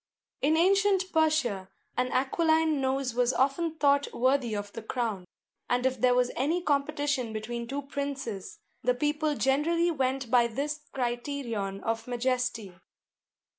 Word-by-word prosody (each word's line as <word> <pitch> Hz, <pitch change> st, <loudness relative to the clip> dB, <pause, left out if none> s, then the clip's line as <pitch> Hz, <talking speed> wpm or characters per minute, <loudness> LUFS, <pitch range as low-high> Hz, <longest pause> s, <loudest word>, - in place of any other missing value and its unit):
In 305 Hz, +3 st, +3 dB
ancient 385 Hz, +1 st, +3 dB
Persia 305 Hz, -, +1 dB, 0.3 s
an 250 Hz, 0 st, +1 dB
aquiline 315 Hz, +2 st, +2 dB
nose 265 Hz, -1 st, 0 dB
was 245 Hz, +1 st, +2 dB
often 310 Hz, +5 st, +1 dB
thought 285 Hz, -2 st, +2 dB
worthy 255 Hz, -2 st, +1 dB
of 205 Hz, 0 st, -5 dB
the 230 Hz, -, -6 dB
crown; 220 Hz, -5 st, -3 dB, 0.4 s
and 245 Hz, +1 st, +1 dB
if 260 Hz, 0 st, 0 dB
there 250 Hz, -1 st, +4 dB
was 250 Hz, 0 st, +2 dB
any 305 Hz, +7 st, +1 dB
competition 285 Hz, -5 st, 0 dB
between 235 Hz, +2 st, -4 dB
two 280 Hz, +3 st, -3 dB
princes, 275 Hz, -8 st, -5 dB, 0.2 s
the 250 Hz, +1 st, +2 dB
people 295 Hz, +3 st, 0 dB
generally 330 Hz, +6 st, +2 dB
went 265 Hz, -4 st, -1 dB
by 240 Hz, -2 st, +5 dB
this 290 Hz, +6 st, -3 dB
criterion 240 Hz, -5 st, -3 dB
of 225 Hz, 0 st, -2 dB
majesty. 245 Hz, -4 st, -1 dB
265 Hz, 135 wpm, -28 LUFS, 240-295 Hz, 0.4 s, by